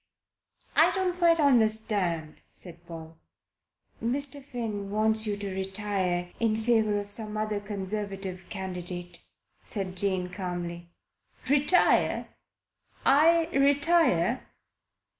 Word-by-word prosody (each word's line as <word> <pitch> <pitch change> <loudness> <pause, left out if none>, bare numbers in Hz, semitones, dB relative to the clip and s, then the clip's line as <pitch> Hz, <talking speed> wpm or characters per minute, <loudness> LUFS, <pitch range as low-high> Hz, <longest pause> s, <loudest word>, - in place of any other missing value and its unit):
"I - - +6
don't 365 -2 -1
quite 335 -1 +4
understand," 215 - +2
said 175 -1 -9
Paul. 165 -1 -10 0.8
"Mr. 280 +4 +2
Finn 225 -7 -5
wants 220 +1 +1
you 205 -1 -1
to 200 -2 -5
retire 190 -2 -2
in 225 -2 +1
favour 220 -2 +2
of 205 0 -5
some 215 0 -1
other 215 -1 -1
Conservative 195 -2 -5
candidate," 180 -2 -6 0.4
said 190 -4 -4
Jane 185 -1 +1
calmly. 175 -2 -5 0.6
"Retire? 290 +6 +3 0.8
I 325 +4 +5
retire?" 280 - +3
205 Hz, 100 wpm, -27 LUFS, 180-240 Hz, 0.8 s, I